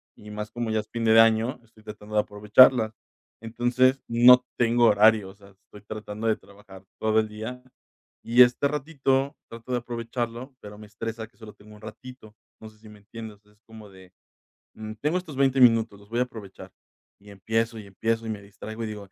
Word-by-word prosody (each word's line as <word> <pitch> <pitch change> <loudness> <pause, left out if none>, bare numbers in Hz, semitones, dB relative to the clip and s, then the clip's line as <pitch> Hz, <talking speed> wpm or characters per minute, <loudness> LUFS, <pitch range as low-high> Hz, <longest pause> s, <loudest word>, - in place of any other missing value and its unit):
y 105 - -14
más 105 +1 -6
como 120 0 -4
ya 110 - +1
es 105 - -19
fin 115 -1 -5
de 110 0 +6
año, 115 +2 +3
estoy 110 -1 -23
tratando 105 0 -11
de 105 - +4
aprovecharlas, 110 +3 +4 0.5
entonces 120 +3 +1
no 125 +2 +6
tengo 120 0 +3
horario, 105 -1 +4
o - - -13
sea, 100 -1 -18
estoy 100 +1 -18
tratando 110 +1 -6
de 110 - +2
trabajar 100 -1 -16 0.2
todo 110 0 +2
el 110 - 0
día 110 +4 -8 0.6
y 120 +2 +7
este 125 +3 +1
ratito 140 -2 -1
trato 115 +2 -10
de 125 - 0
aprovecharlo, 120 +2 -5
pero 105 0 -11
me 105 - -12
estresa 115 +1 -6
que - - -34
solo 110 -2 -12
tengo 105 +1 -17
un 105 - -17
ratito. 110 0 -12 0.3
No 110 - -10
sé 110 - -23
si 110 - -15
me 105 -1 -15
entiendes. 110 0 -11
Es 105 0 -28
como 110 -2 -13
de, 95 -1 -17 0.6
mm, 110 0 -8
tengo 155 +7 0
estos 155 -7 -10
20 135 -1 +2
minutos, 115 -4 +4
los 100 - -19
voy 120 - -2
a - - +4
aprovechar 110 -6 -12 0.5
y 100 0 -16
empiezo 110 +4 -2
y 105 - -10
empiezo 115 +3 -2
y 110 - -4
me 105 -2 -6
distraigo 110 +3 -9
y - - -3
digo: 105 -2 -9
110 Hz, 205 wpm, -25 LUFS, 105-120 Hz, 0.6 s, y